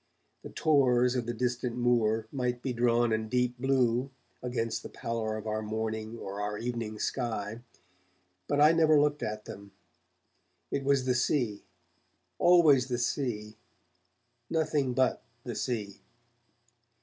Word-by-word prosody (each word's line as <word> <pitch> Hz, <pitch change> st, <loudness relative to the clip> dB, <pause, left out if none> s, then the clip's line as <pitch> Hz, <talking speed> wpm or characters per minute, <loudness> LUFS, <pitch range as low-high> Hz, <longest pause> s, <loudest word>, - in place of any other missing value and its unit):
The -, -, -9 dB
tors 125 Hz, -5 st, +3 dB
of 120 Hz, -2 st, -2 dB
the 120 Hz, -, -1 dB
distant 125 Hz, 0 st, -2 dB
moor 115 Hz, -3 st, +2 dB
might 125 Hz, -2 st, -2 dB
be 130 Hz, -, -1 dB
drawn 120 Hz, -1 st, +2 dB
in 110 Hz, 0 st, -2 dB
deep 125 Hz, 0 st, 0 dB
blue 130 Hz, -1 st, +1 dB, 0.3 s
against 115 Hz, -2 st, -2 dB
the -, -, -9 dB
pallor 110 Hz, -2 st, -3 dB
of 110 Hz, -, -8 dB
our 110 Hz, 0 st, -2 dB
morning 110 Hz, +1 st, -4 dB
or 100 Hz, -1 st, -6 dB
our 105 Hz, 0 st, -2 dB
evening 115 Hz, -2 st, -4 dB
sky, 110 Hz, -2 st, -3 dB, 0.9 s
but 145 Hz, -, 0 dB
I 150 Hz, +2 st, +7 dB
never 160 Hz, -2 st, +5 dB
looked 145 Hz, 0 st, +1 dB
at 105 Hz, 0 st, -4 dB
them. 100 Hz, 0 st, -10 dB, 1.0 s
It 140 Hz, -, -1 dB
was 135 Hz, -1 st, +2 dB
the 130 Hz, -, +2 dB
Sea, 120 Hz, -4 st, 0 dB, 0.8 s
always 160 Hz, -7 st, +5 dB
the 125 Hz, -2 st, -1 dB
sea, 120 Hz, -4 st, -2 dB, 0.9 s
nothing 150 Hz, -5 st, 0 dB
but 130 Hz, 0 st, +2 dB, 0.2 s
the 120 Hz, -, -5 dB
sea. 105 Hz, -6 st, -3 dB
120 Hz, 135 wpm, -29 LUFS, 110-130 Hz, 1.0 s, I